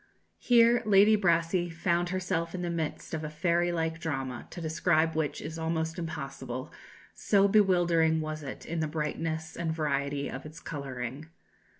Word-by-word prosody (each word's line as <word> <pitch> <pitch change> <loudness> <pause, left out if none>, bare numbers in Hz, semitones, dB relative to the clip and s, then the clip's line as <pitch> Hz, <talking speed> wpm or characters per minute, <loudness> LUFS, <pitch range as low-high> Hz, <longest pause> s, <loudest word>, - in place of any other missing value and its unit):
Here 235 0 +5
Lady 210 0 +6
Brassey 175 -2 +2
found 170 +1 0
herself 180 -2 -2
in 180 - -4
the 175 - -1
midst 160 -2 -4
of 160 -1 -2
a 155 - -3
fairy 170 +3 +1
like 165 -1 -1
drama, 135 -7 -4
to - - -8
describe 160 0 +1
which 155 -2 -1
is 160 +1 -6
almost 160 +1 -2
impossible, 135 -5 -5 0.4
so 200 -1 +3
bewildering 175 -6 +3
was 155 0 -4
it 135 -3 -7
in 170 0 -3
the 155 - 0
brightness 160 +1 -3
and 170 -1 -2
variety 140 -2 -1
of 135 - -6
its 155 +1 -10
colouring. 135 -1 -6
160 Hz, 160 wpm, -29 LUFS, 155-175 Hz, 0.4 s, Lady